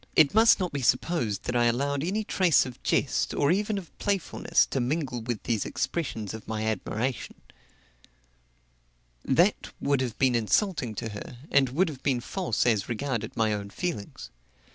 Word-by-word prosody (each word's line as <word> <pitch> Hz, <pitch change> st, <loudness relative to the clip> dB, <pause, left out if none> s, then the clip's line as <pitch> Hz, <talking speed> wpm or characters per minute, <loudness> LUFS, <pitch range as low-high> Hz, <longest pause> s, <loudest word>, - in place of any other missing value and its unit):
It 155 Hz, -3 st, +5 dB
must 225 Hz, +1 st, +6 dB
not 180 Hz, -4 st, -2 dB
be 140 Hz, -, -2 dB
supposed 125 Hz, -, 0 dB
that 125 Hz, -, -3 dB
I 120 Hz, 0 st, +3 dB
allowed 140 Hz, +4 st, 0 dB
any 200 Hz, +6 st, -1 dB
trace 185 Hz, -6 st, +3 dB
of 125 Hz, -2 st, -9 dB
jest, -, -, 0 dB
or 145 Hz, +2 st, +2 dB
even 205 Hz, +3 st, 0 dB
of 185 Hz, -4 st, -8 dB
playfulness, 200 Hz, -4 st, +1 dB
to 135 Hz, -, 0 dB
mingle 130 Hz, -1 st, -1 dB
with 115 Hz, -1 st, -4 dB
these 115 Hz, -4 st, 0 dB
expressions 115 Hz, -, -3 dB
of 110 Hz, -, -9 dB
my 110 Hz, 0 st, -2 dB
admiration; 110 Hz, +4 st, -2 dB, 1.9 s
that -, -, +2 dB
would 140 Hz, -2 st, +1 dB
have 120 Hz, -4 st, -3 dB
been 130 Hz, -2 st, +3 dB
insulting 120 Hz, -, +1 dB
to 115 Hz, +1 st, -4 dB
her, 105 Hz, +3 st, -8 dB
and 135 Hz, -2 st, +4 dB
would 170 Hz, +9 st, +2 dB
have 145 Hz, -5 st, -7 dB
been 130 Hz, -3 st, +1 dB
false 165 Hz, -, -1 dB
as 110 Hz, -5 st, +1 dB
regarded 115 Hz, -2 st, -3 dB
my 110 Hz, -2 st, +2 dB
own 100 Hz, -1 st, -4 dB
feelings. 100 Hz, -, -5 dB
130 Hz, 165 wpm, -27 LUFS, 110-165 Hz, 1.9 s, must